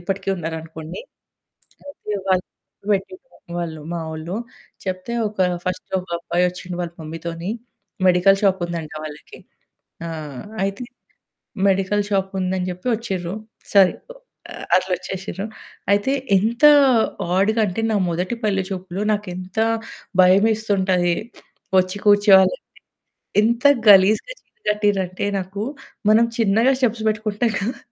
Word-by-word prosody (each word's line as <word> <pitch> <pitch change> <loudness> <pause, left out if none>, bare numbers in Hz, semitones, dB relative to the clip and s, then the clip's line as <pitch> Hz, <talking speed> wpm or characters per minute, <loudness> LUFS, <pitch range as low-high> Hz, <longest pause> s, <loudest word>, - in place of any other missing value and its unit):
ఇప్పటికి 195 +2 -4
ఉన్నారనుకోండి. 160 -1 -6 0.9
అయితే 215 -7 -6
వాళ్ళు 185 -1 +2 0.4
తోని 200 -1 +1
చెప్పేట్టిన్రనమాట 175 - -8
మా 170 - -3
వోళ్ళు. 160 +4 -5 0.5
చెప్తే 185 +5 -4 0.2
ఒక 210 - -18 0.3
ఫస్టొక 185 0 -3
అబ్బాయి 175 +1 +1
వచ్చిండు 180 0 -7
వాళ్ళ 170 -1 -5
మమ్మీ 160 +1 -7
తోని 170 +4 -4 0.6
మెడికల్ 185 +2 +5
షాప్ 190 -1 +3
ఉందంట 165 -3 -5
వాళ్ళకి. 150 -1 -10 0.7
ఆ! - - -4 0.6
అయితే 195 +5 -3 0.9
మెడికల్ 195 +2 +1
షాప్ 195 -1 0
ఉందని 185 0 -1
జెప్పి 180 +8 -5
వచ్చిర్రు. 190 -5 -4 0.4
సరే 195 -2 +7 0.6
ఆహ్, - - -7
అట్లా 185 0 -1
వచ్చేసిర్రు. 190 +2 -6 0.5
అయితే 205 +7 +2 0.2
ఎంత 230 +7 +1 0.7
ఆడ్‌గా 215 +4 +2
అంటే 185 +2 -3
నా 215 - +2
మొదటి 180 +7 -2
పెళ్ళి 195 -3 +1
చూపులు 185 +1 -4
నాకెంత 185 -1 -5 0.6
భయమేస్తుంటది. 190 -2 +3 0.6
వచ్చి 185 +2 0
కూర్చోవాలంటే. 200 -2 +6 0.8
ఎంత 235 +3 +1 0.2
గలీజ్‌గా 205 - +6
చీర 475 - -44
కట్టింర్రంటే 200 -3 0
నాకు, 195 +2 -5 0.5
మనం 225 +2 +5
చిన్నగా 225 +3 +3
స్టెప్స్ 235 -3 +1
పెట్టుకుంటాం 215 +2 0
కదా! 235 +4 -3
190 Hz, 115 wpm, -21 LUFS, 180-210 Hz, 0.9 s, సరే